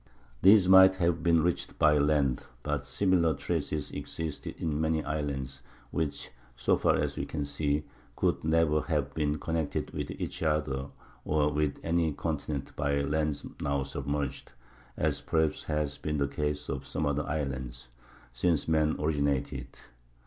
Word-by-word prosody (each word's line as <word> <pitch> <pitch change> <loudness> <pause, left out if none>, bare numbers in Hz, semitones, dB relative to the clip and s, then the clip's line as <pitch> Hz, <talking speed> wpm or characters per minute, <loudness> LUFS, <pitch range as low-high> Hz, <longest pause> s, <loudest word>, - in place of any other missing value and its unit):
These 100 0 +7
might 95 0 +8
have 85 -3 +1
been 85 -1 +4
reached 85 0 -1
by 75 -1 +5
land; 70 -3 +1 0.2
but 75 -2 -2
similar 85 -2 +2
traces 75 +2 -2
exist 80 -3 -5
in 75 -2 -2
many 80 -1 +1
islands 70 -4 -3 0.3
which, 75 -2 -2 0.2
so 65 0 +2
far - - +3
as - - -1
we - - -2
can 75 -2 -3
see, 70 +1 0 0.3
could - - 0
never 80 -1 +3
have 75 -4 -1
been 75 -1 0
connected 80 0 -2
with - - -4
each - - -5
other 75 -4 0 0.4
or 75 -1 +1
with 75 -1 0
any 80 -1 +1
continent 75 -2 -3
by 70 0 0
lands 75 0 -1 0.2
now 70 -1 0
submerged 70 -1 -4 0.4
(as - - 0
perhaps 80 -1 0
has 75 -2 -2
been 75 -1 -2
the 70 -1 +1
case 75 +1 -2
in 65 -1 -3
some 70 +3 -3
other 75 +1 0
islands) 65 -4 -4 0.4
since 75 +5 +1
man 80 -1 +2
originated. 70 -3 0
75 Hz, 150 wpm, -29 LUFS, 70-80 Hz, 0.4 s, might